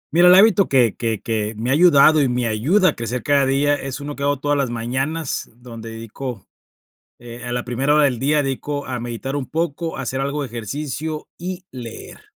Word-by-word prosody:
Mira, 175 +1 +7
el 180 - +9
hábito 200 -1 +5
que 125 -5 +3
que 115 -3 -2
que 110 -1 -2
me 120 +3 -1
ha - - +4
ayudado 155 -2 +6
y 135 - +3
me 125 0 -1
ayuda 150 - +3
a - - -3
crecer 115 +1 -4
cada 140 -2 +3
día, 140 +2 +2
es 135 -1 -4
uno 145 0 -6
que - - -10
hago 145 0 +1
todas 145 +1 0
las 140 -3 0
mañanas, 130 +6 -3
donde 115 -2 -10
dedico, 115 0 -7 0.7
eh, 120 0 -10
a 120 - -4
la 120 0 -2
primera 135 +4 +1
hora 150 - +5
del 125 -5 +1
día, 145 +2 +2
dedico 145 +1 -3
a 125 -2 -4
meditar 120 +3 -5
un 140 -3 -3
poco, 165 0 -2
a - - -4
hacer 135 +1 -3
algo 140 +2 -2
de - - -4
ejercicio 150 +7 -5
y 180 +1 -6
leer. 120 -3 -9
135 Hz, 215 wpm, -21 LUFS, 120-150 Hz, 0.7 s, el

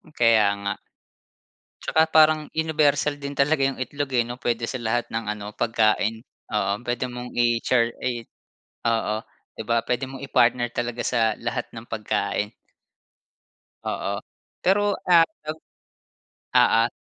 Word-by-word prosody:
Kaya 115 -3 +5 0.2
nga. 100 0 0 1.1
Tsaka, 160 0 +2
parang 155 -1 +5
universal 150 -2 +2
din 140 -1 -6
talaga 140 +1 +2
'yong 135 0 0
itlog 140 +2 -3
eh, 120 -2 +3
'no, 120 - -5
puwede 120 -2 -1
sa - - -4
lahat 115 +1 0
ng 115 0 -3
ano 105 0 -7
pagkain. 110 -1 +1 0.3
Oo. 105 +1 0
Puwede 120 +1 -2
mong 125 0 -7
i-shar 120 0 +2
e 120 -2 -2 0.6
Oo, 110 -2 0 0.6
puwede 125 +2 -1
mong 135 -1 -9
i-partner 120 -2 +3
talaga 120 0 -2
sa 115 -3 +2
lahat 120 0 -3
ng 115 +1 -9
pagkain. 105 -1 -2 1.3
Oo. - - -2 0.4
Pero 205 +2 +3
ah, 170 -2 +7 0.2
op 155 +1 -3 1.0
oo. 115 +1 +5
120 Hz, 125 wpm, -24 LUFS, 115-140 Hz, 1.3 s, ah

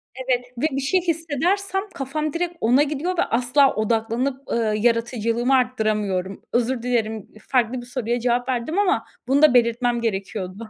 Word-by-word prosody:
Evet 255 -1 -1
ve 300 - 0
bir 275 +1 -2
şey 360 +7 +1
hissedersem 345 +4 -1
kafam 300 +2 -3
direkt 345 0 -2
ona 250 +6 +4
gidiyor 305 +5 -2
ve - - +3
asla 250 +4 +2
odaklanıp, 230 +5 -1
ııı, 220 -2 +1
yaratıcılığımı 230 +2 +1
arttıramıyorum. 210 -6 -1
Özür 240 0 +1
dilerim. 225 -4 -1 0.2
Farklı 245 -1 +1
bir - - -11
soruya 245 -1 -2
cevap 245 +1 0
verdim 260 +10 -1
ama 405 0 +1 0.2
bunu 275 +3 +3
da 305 -4 +6
belirtmem 240 0 +2
gerekiyordu. 200 0 -4
245 Hz, 150 wpm, -22 LUFS, 230-280 Hz, 0.2 s, da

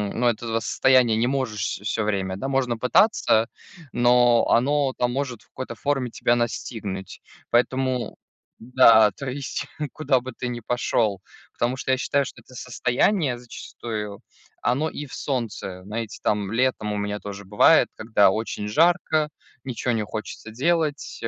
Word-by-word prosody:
Ну, 120 +2 +1
этого 115 0 0
состояния 125 0 +3
не 115 +2 +1
можешь 130 -5 -2
вс - - -2
всё 105 +1 -1
время, 95 -3 -1
да. 135 - -4
Можно 130 -3 0
пытаться, 125 - +3 0.5
но 120 -1 +4
оно-то 135 0 +2
может 125 -2 -3
в - - -30
какой-то 130 -2 -7
форме 135 +1 -1
тебя 120 +1 +1
настигнуть. 110 -5 -4 0.3
Поэтому 130 +1 +1 0.4
да, 115 -3 +6
то 135 +5 -6
есть 135 +1 -4 0.3
куда 140 -4 +1
бы 130 0 -8
ты 125 - -4
ни 120 -1 -4
пошёл. 115 -4 0 0.3
Потому 125 +2 -1
что 130 - -2
я 130 - +3
считаю, 140 +1 0
что - - -10
это 130 - -17
состояние 125 - 0
зачастую, 110 -3 -7 0.4
оно 135 +6 +1
и 150 - -6
в 135 - -13
солнце. 110 -8 -4
Знаете, 110 +2 -5
там 105 -2 0
летом 115 -3 0
у 105 - -2
меня 105 0 -3
тоже 100 -1 -8
бывает, 105 +2 +5
когда 110 -3 +3
очень 105 0 -3
жарко, 155 - +2 0.3
ничего 125 -1 -2
не 110 -2 0
хочется 110 +2 -7
делать, 150 +4 -1
э, - - 0
120 Hz, 155 wpm, -24 LUFS, 110-130 Hz, 0.5 s, да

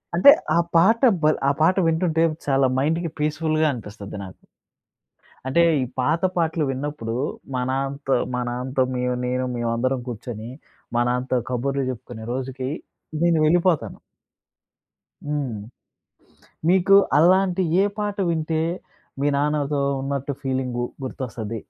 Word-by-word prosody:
అంటే 280 +11 +9 0.2
ఆ - - +4 0.2
పాట 215 +8 +5 0.2
భల్ 155 0 +4
ఆ - - +4
పాట 180 +4 +4
వింటుంటే 165 0 +1 0.2
చాలా 135 -1 +3
మైండ్‌కి 165 +4 0
పీస్‌ఫు‌ల్‌గా 155 +1 +1
అనిపిస్తది 105 -3 -8
నాకు. 95 -1 -12 1.1
అంటే 170 +6 +3 0.2
ఈ - - +1 0.2
పాత 155 +7 +1
పాటలు 160 -2 +1
విన్నప్పుడు 135 -4 -4 0.4
మా 125 - 0
నాన్నతో 135 +1 -1 0.2
మా 125 - 0
నాన్నతో 130 +2 -1
మేము 125 0 0
నేను 125 +1 -1
మేమందరం 120 +3 0
కూర్చొని 115 -1 -6 0.5
మా 120 - +3
నాన్నతో 125 +1 0
కబుర్లు 135 +2 -1
చెప్పుకునే 110 -2 -8
రోజుకి 130 0 -4 0.5
నేను 170 -1 +3
వెళ్ళిపోతాను. 175 0 +2 1.3
హ్మ్. 140 -8 -2 1.1
మీకు 190 +2 +5 0.2
అలాంటి 185 +2 +4 0.2
ఏ - - +3
పాట 205 -1 -2
వింటే 160 -1 0 0.6
మీ 145 - +2
నాన్నతో 145 -1 0 0.2
ఉన్నట్టు 140 0 -2
ఫీలింగు 130 -2 -2 0.2
గుర్తొస్తది? 115 -4 -5
140 Hz, 120 wpm, -23 LUFS, 125-160 Hz, 1.3 s, అంటే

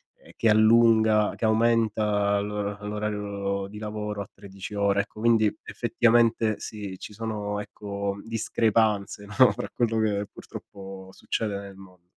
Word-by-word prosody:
ehm, - - -18
che 115 - +2
allunga 110 -1 +5
che 115 - -1
aumenta 110 -2 +2
l'or 105 0 -3
l'orario 100 -2 -3
di 105 - -10
lavoro 105 -1 -4
a 100 - -8
13 100 +1 -10
ore, 100 0 +2
ecco 105 +1 -10
quindi 115 -2 +4 0.2
effettivamente 115 -2 +2
sì, 100 -3 -7
ci - - -9
sono 105 -1 -3
ecco 100 -1 -5
discrepanze 110 -2 0
no, 120 +5 +5
fra - - -5
quello 115 -2 0
che 105 -2 0
purtroppo 95 -1 -10
succede 105 -3 -3
nel 100 -1 -10
mon 90 -2 -16
105 Hz, 140 wpm, -26 LUFS, 100-110 Hz, 0.2 s, allunga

